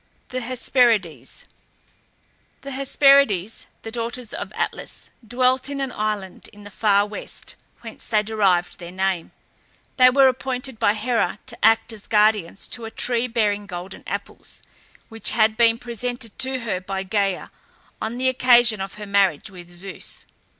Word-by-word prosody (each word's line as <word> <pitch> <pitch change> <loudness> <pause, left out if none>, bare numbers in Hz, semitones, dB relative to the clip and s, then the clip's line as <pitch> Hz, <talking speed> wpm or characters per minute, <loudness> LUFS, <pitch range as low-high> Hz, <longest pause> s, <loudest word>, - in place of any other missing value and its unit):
THE 255 0 -3
HESPERIDES. 230 - 0 1.2
The 275 - -7
Hesperides, 275 - +3 0.2
the 225 - -6
daughters 235 0 -5
of - - -5
Atlas, - - -4 0.2
dwelt 255 +3 +1
in 280 -1 -4
an 270 -2 -2
island 210 -4 -4
in 205 0 -15
the 205 - -11
far 205 0 +3
west, 210 0 -9 0.3
whence - - -9
they 215 -2 +2
derived 200 -5 +1
their 170 -1 -8
name. 190 -2 -1 0.7
They 255 -1 +8
were 270 +1 +6
appointed 260 -1 -2
by 205 - +3
Hera 235 -1 0
to - - -3
act 225 +1 +4
as 210 -2 -11
guardians 210 -4 +2
to 235 - -5
a - - -5
tree 240 +1 0
bearing 210 -4 0
golden 180 +1 -8
apples, - - -6 0.5
which 225 -1 -4
had 220 -1 +4
been 230 0 +4
presented 240 -1 -5
to 260 -1 -1
her 210 -6 -2
by 190 +1 -4
Gæa 195 -1 -1 0.5
on 225 +2 -3
the 260 +1 0
occasion 240 -4 +4
of 195 0 -5
her 210 0 -7
marriage 200 -3 +1
with 175 -2 -12
Zeus. 180 +2 -7
220 Hz, 150 wpm, -22 LUFS, 195-250 Hz, 1.2 s, They